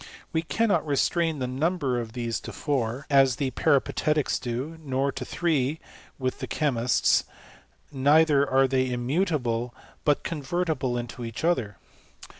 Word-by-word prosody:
We 160 - +2
cannot 215 +5 +1
restrain 160 +2 +1
the 130 - -2
number 135 0 0
of 115 -2 -6
these 120 -2 -2
to - - -8
four, 130 -3 -2
as 135 -3 +4
the 135 0 -2
Peripatetics 150 +1 +1
do; 130 +7 -4
nor 135 0 0
to - - -6
three, 155 -3 0 0.4
with 130 -1 -2
the - - -4
chemists: 125 -6 +2 0.7
neither 145 +1 +4
are 135 0 +4
they 130 0 +1
immutable, 125 -3 -1 0.3
but 145 -2 +2
convertible 150 -4 -2
into 120 0 -6
each 115 +5 -6
other. 125 - 0
135 Hz, 135 wpm, -26 LUFS, 125-155 Hz, 0.7 s, as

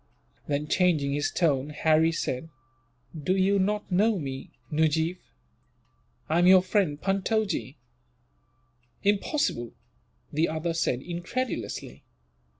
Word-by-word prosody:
Then, 150 +1 -1
changing 155 -6 +2
his 145 0 0
tone, 145 -5 +1
Harry 155 +2 +3
said: 160 -2 -3 0.6
"You 160 - -7
do 190 +5 +2
not 205 +1 -1
know 210 +4 +3
me, 135 -5 -5 0.2
Nujeef. 160 +3 +1 1.1
I 160 +2 +2
am 175 - +5
your 185 -1 +7
friend, 185 -6 +1
Puntojee." 195 - -1 1.3
"Impossible!" 205 - 0 0.6
the 155 +3 +2
other 160 +2 -2
said, 135 -6 -1
incredulously. 175 - -4
165 Hz, 105 wpm, -27 LUFS, 150-195 Hz, 1.3 s, your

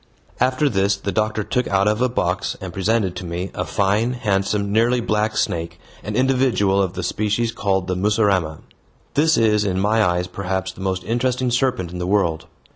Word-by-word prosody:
After 130 +4 +2
this 100 -4 +1
the 100 0 -3
doctor 110 0 0
took 125 +3 -1
out 100 +1 +2
of 105 +2 +1
a 125 - +3
box 90 -5 -1
and 95 -2 -7
presented 95 -1 0
to 95 - -5
me 90 +2 -4
a - - -2
fine, 105 +4 +1
handsome, 100 -3 -1
nearly 115 +3 +3
black 105 -2 0
snake, 85 0 -2 0.2
an 105 +1 -5
individual 125 -7 +2
of 95 -2 -1
the 95 - -4
species 105 +5 0
called 95 -5 -1
the 90 0 -2
mussurama. 95 -5 +1 0.5
This 160 +2 +3
is 105 -2 +3
in 95 -2 -1
my 110 +3 +2
eyes 90 -2 +1
perhaps 95 0 -3
the 95 - -13
most 95 -1 -2
interesting 125 +2 0
serpent 125 -8 0
in 90 - -6
the 90 - -2
world. 85 -5 0
100 Hz, 190 wpm, -21 LUFS, 95-115 Hz, 0.5 s, a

